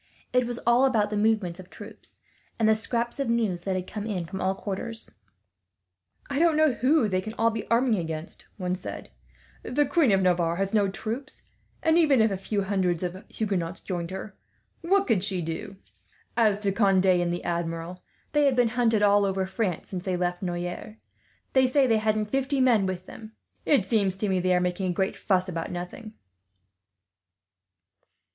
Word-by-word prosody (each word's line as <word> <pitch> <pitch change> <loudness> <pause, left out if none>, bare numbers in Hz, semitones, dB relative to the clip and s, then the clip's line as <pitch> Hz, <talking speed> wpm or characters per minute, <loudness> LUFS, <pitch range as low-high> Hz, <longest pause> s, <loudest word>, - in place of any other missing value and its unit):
It 250 -1 +3
was 240 -1 -3
all 240 +3 +5
about 215 -6 +1
the - - -1
movements 205 -5 +1
of 185 -1 -11
troops, 210 +2 -13 0.4
and 220 - +2
the 220 - +6
scraps 235 +3 -2
of 275 - -1
news 220 -7 0
that 190 +1 -2
had 185 -1 -2
come 210 +2 -6
in 185 -6 -2
from 190 +4 -6
all 190 +1 +1
quarters. 225 +4 -6 1.2
"I 280 0 -2
don't 330 -2 +4
know 310 -2 +5
who 255 0 +2
they 185 -2 0
can 215 +3 -6 0.2
be 220 -2 -3
all - - -22
arming 230 -2 +3
against," 160 0 -6
one 180 -2 -2
said. 185 - -7 0.5
"The 290 +3 +1
Queen 280 -3 +3
of 190 -1 +3
Navarre 175 -2 +2
has 195 +2 -2
no 205 -2 +3
troops 230 +8 -6 0.4
and, 320 +1 +4
even 290 -6 +4
if 220 -1 +4
a 195 - -1
few 200 +1 -2
hundreds 185 -3 0
of 180 +2 -4
Huguenots 190 -5 -2
joined 175 -3 -4
her, 190 +1 -7 0.5
what 390 +4 +2
could 215 -8 +1
she 195 -3 -1
do? 175 +5 -5 0.6
As 215 -4 +3
to 200 -1 +1
Conde 195 -2 +3
and 175 -2 +3
the 175 - -3
Admiral, 170 +1 -3 0.3
they 295 -1 +3
have 275 -2 +3
been 245 -2 +3
hunted 225 -3 +2
all 205 0 +5
over 190 -1 0
France, 190 -2 -2
ever 180 - -2
since - - -16
they 185 -2 0
left 175 0 -1
Noyers. 175 +3 -4 0.6
They 260 -1 +5
say 270 +2 +3
they 225 -3 +3
hadn't 215 -1 0
fifty 270 +1 0
men 235 -7 +4
with 185 -1 -4
them. 220 +2 -11 0.3
It 270 -10 +4
seems 200 -3 +1
to 200 +1 -2
me 190 -1 +1
they 180 0 +2
are - - +3
making 180 +1 -1
a - - 0
great 190 +2 0
fuss 185 -2 +1
about 165 -3 -4
nothing." 180 +5 -7
200 Hz, 195 wpm, -26 LUFS, 185-230 Hz, 1.2 s, the